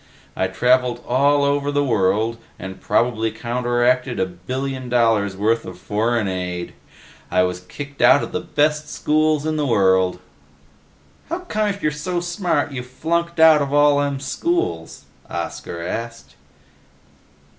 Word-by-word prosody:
I 95 - 0
traveled 125 +4 +1
all 140 +3 +3
over 140 0 +1
the 145 0 +1
world 110 -1 +1 0.2
and 95 +1 -8
probably 115 -2 +1
counteracted 120 +1 0
a - - +2
billion 130 +9 -5
dollars' 115 -5 +2
worth 115 +3 +1
of 90 -1 -9
foreign 105 +3 0
aid. 90 -2 -4 0.6
I 90 +1 +3
was 90 0 -2
kicked 140 +10 -9
out 145 - +6
of - - -6
the - - -2
best 150 0 0
schools 155 0 +1
in 155 0 -1
the 150 - 0
world." 95 -5 +3 1.1
"How 340 +3 -3
come 215 -12 -1
if 200 0 -4
you're 150 - +2
so 175 +4 -3
smart 170 -4 -1
you 130 -2 -4
flunked 170 +7 -2
out 160 -2 +7
of 140 -1 -2
all 145 -1 +5
them 140 -1 -1
schools?" 140 - -2 0.2
Oscar 85 - -5
asked. 115 +4 -6
125 Hz, 145 wpm, -21 LUFS, 105-150 Hz, 1.1 s, out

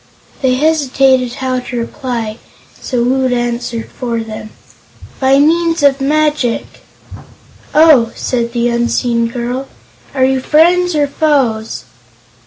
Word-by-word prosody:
They 255 -2 +2
hesitated 270 -4 +2
how 255 -1 -2
to 250 0 -6
reply, 235 -2 -4 0.3
so 245 -2 -3
Woot 260 +1 +1
answered 240 -1 -2
for 235 -3 -3
them: 215 -1 -8 0.7
"By 270 0 +3
means 330 +2 +2
of 275 -1 +3
magic." 295 -4 0 1.1
"Oh," 300 -7 +5
said 235 -2 -2
the 235 0 0
unseen 235 0 0
girl. 245 +3 -4 0.5
"Are 260 -1 +3
you 265 0 +1
friends, 345 +5 +3
or 295 -1 +2
foes?" 270 -7 0
255 Hz, 115 wpm, -14 LUFS, 235-285 Hz, 1.1 s, Oh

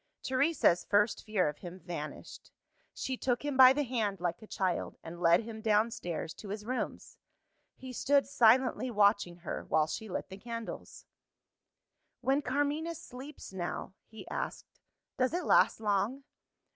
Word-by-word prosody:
Teresa's 260 - +2
first 205 +1 +2
fear 210 -6 +1
of 150 0 -4
him 180 0 -9
vanished. 170 -4 -7 0.4
She 260 -1 -4
took 245 +2 -1
him 290 -2 -1
by 260 -1 +9
the 290 +2 +1
hand 225 -6 -1
like 175 +3 -2
a 215 - -12
child, 185 -4 -2
and 170 +1 -8
led 170 +4 +5
him 220 -1 -8
downstairs 210 -7 0
to 205 - -9
his 210 +1 -5
rooms. 255 +2 -4 0.6
He 260 -1 -9
stood 280 +3 +3
silently 250 -1 +3
watching 205 -5 +3
her, - - -3
while 155 -1 +2
she 215 +7 -5
lit - - -4
the 190 - -8
candles. 230 +2 -7 1.2
"When 275 +2 +2
Carmina 290 +5 -1
sleeps 270 -6 -10
now," 180 +1 -4
he 220 - -11
asked, - - -5 0.4
"does 255 +5 +2
it 360 - -2
last - - +4
long?" 215 +5 0
220 Hz, 150 wpm, -31 LUFS, 190-260 Hz, 1.2 s, by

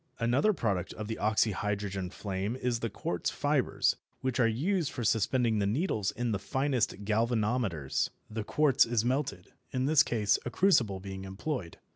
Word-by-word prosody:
Another 125 - +3
product 100 - -1
of 105 - -6
the 110 - -3
oxyhydrogen 105 -3 0
flame 100 +3 -3
is 125 -2 -1
the 115 - -2
quartz 90 -3 -2
fibres - - +1 0.2
which 130 -1 -1
are 120 - +5
used 160 - 0
for 120 - -4
suspending 115 +1 +2
the 100 - +1
needles 110 - 0
in 120 +2 -2
the 100 - -1
finest 125 -2 -1
galvanometers. 110 - 0 0.2
The 110 0 -4
quartz 145 +4 +4
is 115 -1 0
melted, 125 -8 -2 0.2
in 130 0 -1
this 150 +1 +6
case 105 -7 +2
a - - -3
crucible 120 - +3
being 95 0 -7
employed. 95 - -4
110 Hz, 160 wpm, -30 LUFS, 100-125 Hz, 0.2 s, this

